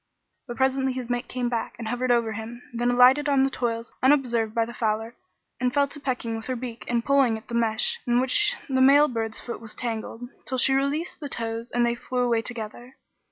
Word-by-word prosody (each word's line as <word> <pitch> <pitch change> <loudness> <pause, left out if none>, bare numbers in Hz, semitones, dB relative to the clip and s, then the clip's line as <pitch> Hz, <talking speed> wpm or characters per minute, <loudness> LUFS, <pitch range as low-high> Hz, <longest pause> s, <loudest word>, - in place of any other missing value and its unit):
But 240 - -6
presently 265 0 +1
his 250 -1 -5
mate 245 0 -2
came 250 -1 -2
back 235 -1 -3
and 230 -1 -6
hovered 245 +2 -1
over 235 -2 +2
him, 225 +3 -7
then 240 +1 0
alighted 255 +4 +5
on 275 -2 +4
the 270 - +1
toils 230 -2 -3
unobserved 245 -5 +2
by 230 -1 +2
the 235 - -9
fowler, 225 +1 -2 0.4
and 250 0 +1
fell 280 +2 +2
to 290 - -8
pecking 250 -4 -2
with 225 0 -7
her 255 - -1
beak 235 -1 -7
and 235 -1 0
pulling 270 -5 +3
at 220 - -15
the - - -7
mesh 225 -2 +1
in 240 0 +3
which 265 +12 +2
the 260 -2 +1
male 285 +3 +7
bird's 225 -3 -3
foot 235 - -7
was 225 -2 -8
tangled, 230 0 -4 0.2
till 260 - -2
she 270 +2 +3
released 280 +5 -1
the 290 - -5
toes 230 -1 -3
and 240 0 +1
they 235 - +1
flew 250 +1 -3
away 235 -2 +2
together. 240 +2 -6
245 Hz, 220 wpm, -25 LUFS, 230-260 Hz, 0.4 s, male